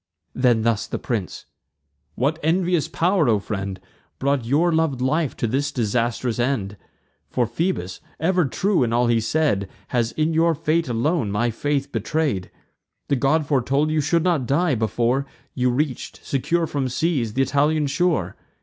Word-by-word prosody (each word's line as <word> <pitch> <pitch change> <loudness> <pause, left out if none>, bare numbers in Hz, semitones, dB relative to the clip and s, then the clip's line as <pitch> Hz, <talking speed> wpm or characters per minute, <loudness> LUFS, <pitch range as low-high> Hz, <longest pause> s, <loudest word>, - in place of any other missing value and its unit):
Then 120 -3 +2
thus 115 -2 +1
the - - -3
prince: 110 -7 -4 0.7
"What 145 +6 0
envious 170 0 +1
pow'r, 170 -3 +2
O 110 - +4
friend, 100 -2 -4 0.4
Brought 140 -3 0
your 160 +8 +2
lov'd 160 -5 +1
life 145 +3 0
to - - -1
this 135 +6 0
disastrous 120 +1 -1
end? 120 -6 -1 0.5
For 125 - +1
Phoebus, 115 - -2 0.2
ever 180 +1 +2
true 190 +7 +1
in 115 -2 +1
all 120 +1 +3
he 120 -1 +3
said, 115 -6 0 0.2
Has 120 -2 0
in 155 +1 0
your 165 +1 +3
fate 165 +1 0
alone 120 - 0
my 115 +4 0
faith 140 +3 -2
betray'd. 115 - -1 0.6
The 140 - +3
god 145 +4 +2
foretold 140 +2 +1
you 155 -1 +2
should 165 +3 +1
not 165 -9 +1
die, 160 +3 +2
before 120 +4 0 0.3
You 125 -1 +1
reach'd, 130 +1 -2
secure 165 +5 0
from 140 -4 -2
seas, 130 -5 0
th' - - -12
Italian 145 +3 +2
shore. 175 +4 0
135 Hz, 160 wpm, -22 LUFS, 120-160 Hz, 0.7 s, O